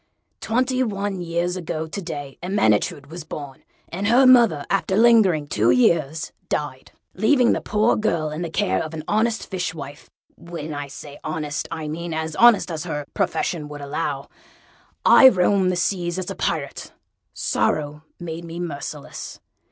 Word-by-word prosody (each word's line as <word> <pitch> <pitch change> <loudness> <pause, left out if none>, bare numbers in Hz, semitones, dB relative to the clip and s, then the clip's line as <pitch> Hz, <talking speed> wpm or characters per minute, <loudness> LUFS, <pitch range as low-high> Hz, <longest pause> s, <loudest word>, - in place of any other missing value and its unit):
Twenty 255 +3 0
one 200 -5 -2
years 175 +1 -1
ago 160 -3 -4
to 160 +5 -6
day 145 -6 -7
Ermyntrude 145 - +1
was 170 0 -7
born, 145 -3 -8 0.3
and 195 +4 -3
her 245 +4 +5
mother, 235 - +5
after 195 0 0
lingering 215 -10 +5
two 115 -5 +1
years, 150 +5 +2 0.2
died. 140 -3 -4 0.2
Leaving 245 +5 +3
the - - +1 0.4
girl 165 -7 0
in 155 +2 -5
the 170 - -3
care 95 - 0
of 160 0 -5
an 155 - -6
honest 220 +2 0
fishwife 170 -6 -5 0.3
(when 170 -3 -7
I 145 0 -5
say 145 +1 -10
honest, 155 -1 -3
I 160 -2 -5
mean, 165 +2 -4
as 160 0 -3
honest 235 -6 +5
as 160 +1 -4
her 150 -4 -4
profession 150 -4 -1
allowed), 145 -1 -4 0.8
I 265 - +9
roamed 190 -2 +2
the - - -1
seas 175 -1 -1
as 185 -1 -4
a - - -6
Pirate: - - -3 0.4
sorrow 150 0 -1 0.2
made 170 -1 -6
me 170 0 -7
merciless. 150 -3 -6
165 Hz, 150 wpm, -22 LUFS, 150-190 Hz, 0.8 s, I